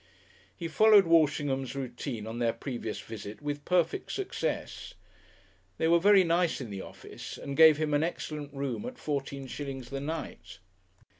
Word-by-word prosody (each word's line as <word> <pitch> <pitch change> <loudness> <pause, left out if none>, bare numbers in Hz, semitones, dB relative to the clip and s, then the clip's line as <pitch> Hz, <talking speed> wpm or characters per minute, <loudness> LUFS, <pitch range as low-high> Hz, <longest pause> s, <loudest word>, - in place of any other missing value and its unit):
He 170 - -4
followed 210 +4 +6
Walshingham's 145 -5 +2
routine 125 -3 -5
on 115 +2 -5
their 115 -1 +1
previous 115 -2 -5
visit 105 -1 -8
with 145 0 -4
perfect 175 -3 +1
success. - - -4 0.8
They 160 - +1
were 170 +1 +5
very 200 +1 +6
nice 170 0 +1
in 120 -6 -6
the 100 -1 -5
office, - - -9
and 140 0 -6
gave 160 -1 +8
him 155 -1 -1
an 145 - +3
excellent 150 -3 -4
room 140 - -3
at 250 0 -8
fourteen 140 -2 -3
shillings 135 -2 -6
the 135 - -3
night. 160 -5 -6
145 Hz, 155 wpm, -29 LUFS, 130-165 Hz, 0.8 s, gave